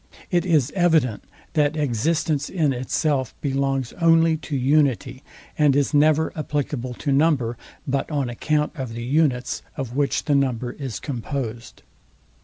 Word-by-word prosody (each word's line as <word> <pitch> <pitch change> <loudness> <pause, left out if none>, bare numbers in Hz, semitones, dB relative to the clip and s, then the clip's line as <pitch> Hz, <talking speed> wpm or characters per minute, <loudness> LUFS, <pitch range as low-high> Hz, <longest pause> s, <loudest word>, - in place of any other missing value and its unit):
It 175 0 +1
is 150 -6 +2
evident, 160 - +2 0.3
that 150 0 +2
existence 150 +2 0
in 155 -7 +1
itself 130 +1 -1
belongs 135 -2 -1
only 165 -1 +5
to 150 -2 -4
unity, 135 -1 +1 0.4
and 145 -3 +4
is 145 +2 +1
never 155 +2 +3
applicable 145 -5 -3
to 145 - -2
number, 135 -5 +2 0.3
but 140 0 -1
on 145 -4 -1
account 150 +5 0
of 130 -6 -5
the 115 - -5
unites, 130 -2 +1 0.2
of 130 -4 -4
which 140 -1 0
the 145 - +1
number 130 -3 +1
is 130 -9 -6
composed. 120 -1 -5
140 Hz, 140 wpm, -23 LUFS, 125-155 Hz, 0.4 s, only